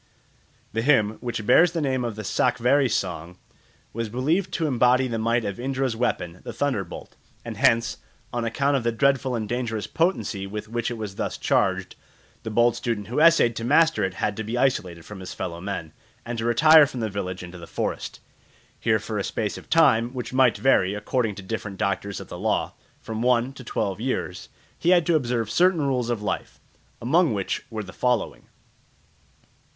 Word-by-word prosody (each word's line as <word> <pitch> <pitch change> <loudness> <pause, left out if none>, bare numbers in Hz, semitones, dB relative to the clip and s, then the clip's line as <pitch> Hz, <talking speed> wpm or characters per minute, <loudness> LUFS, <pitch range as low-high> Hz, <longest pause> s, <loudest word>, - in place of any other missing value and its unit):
The 115 - 0
hymn, 110 -5 +2
which 120 -3 -4
bears 170 +9 +5
the 170 - -1
name 130 -4 0
of 115 -3 -3
the 110 - -6
Sakvari¯ 125 +5 +2
song, 90 -4 -3 0.6
was 115 -1 -3
believed 160 - 0
to 165 - 0
embody 125 -1 +3
the 115 -2 -3
might 115 +1 +1
of 100 +2 -4
Indra's 130 -1 -1
weapon, 90 -7 -2
the - - -6
thunderbolt; 120 -11 -3 0.3
and - - -5
hence, 115 0 +2 0.4
on 120 -1 -1
account 140 +5 +1
of 135 - +1
the 115 - +1
dreadful 135 +1 +1
and 110 -2 -3
dangerous 115 -3 -2
potency 160 - -1
with 105 +2 -6
which 115 +1 -2
it 120 - -4
was 105 -3 -6
thus - - -3
charged, 95 -2 0 0.5
the 110 - -5
bold 120 +2 +3
student 110 -3 -3
who 125 - -1
essayed 160 -8 +5
to 115 - -4
master 160 +6 +3
it 95 0 -2
had 105 +1 -1
to 110 - -3
be 115 +3 -3
isolated 95 -11 0
from 105 -2 -9
his 95 0 -8
fellow 85 -2 -5
men, 85 -5 -5 0.3
and 120 -1 -4
to 115 - -2
retire 150 +6 +7
from 130 - -7
the 110 - 0
village 95 -3 -4
into 90 0 -9
the 85 - -10
forest. - - -4 0.6
Here - - +2
for - - -4
a - - -1
space - - -2
of - - -11
time, 125 -6 +4
which 125 -1 -5
might 130 -2 +4
vary, 100 -7 +3
according 105 +1 -1
to 100 - -9
different 100 -1 -5
doctors 100 +1 -2
of - - -9
the - - -8
law, - - 0 0.3
from 110 0 -5
one 125 +1 +2
to 135 - -11
twelve 100 -4 -2
years, 115 -7 -3 0.3
he 170 - +1
had 175 -2 +5
to 170 - +3
observe 120 -6 0
certain 180 +1 +3
rules 125 -4 0
of 115 -3 -2
life, 95 -2 -4 0.4
among 155 +1 +2
which 100 -2 -2
were 110 -2 -4
the 95 - -11
following. 125 -3 -1
115 Hz, 195 wpm, -24 LUFS, 105-130 Hz, 0.6 s, retire